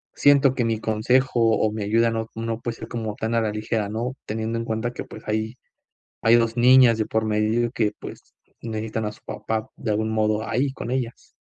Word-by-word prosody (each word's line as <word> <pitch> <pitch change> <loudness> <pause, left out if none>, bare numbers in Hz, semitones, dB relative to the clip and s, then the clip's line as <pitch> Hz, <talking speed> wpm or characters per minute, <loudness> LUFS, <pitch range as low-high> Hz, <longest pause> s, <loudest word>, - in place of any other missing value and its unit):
siento 140 -2 +5
que 125 - +1
mi 115 -1 0
consejo 120 +4 +1 0.2
o 110 - +1
mi 110 0 -4
ayuda 115 +3 +2
no 115 0 -2
no 115 0 -3
puede 115 -1 -4
ser 115 - -8
como 110 -3 -4
tan 110 +1 -3
a 115 - +3
la 110 -1 0
ligera, 105 0 -2
¿no?, 115 +4 -3
teniendo 110 +1 -3
en - - -2
cuenta 110 +2 -2
que, - - -5
pues, - - -12
hay 110 +2 -1 0.7
hay 115 +1 +6
2 115 0 +1
niñas 125 -1 +6
de 110 - 0
por 110 0 0
medio 110 +2 +1
y - - -6
que, 110 -4 0
pues, - - -10 0.3
necesitan 110 -1 -3
a 105 - -3
su - - -18
papá, 110 0 -3
de 110 - -4
algún 110 +1 0
modo, 110 0 0
ahí 135 +4 0
con 125 - -6
ellas. 125 -2 -4
115 Hz, 220 wpm, -24 LUFS, 110-120 Hz, 0.7 s, hay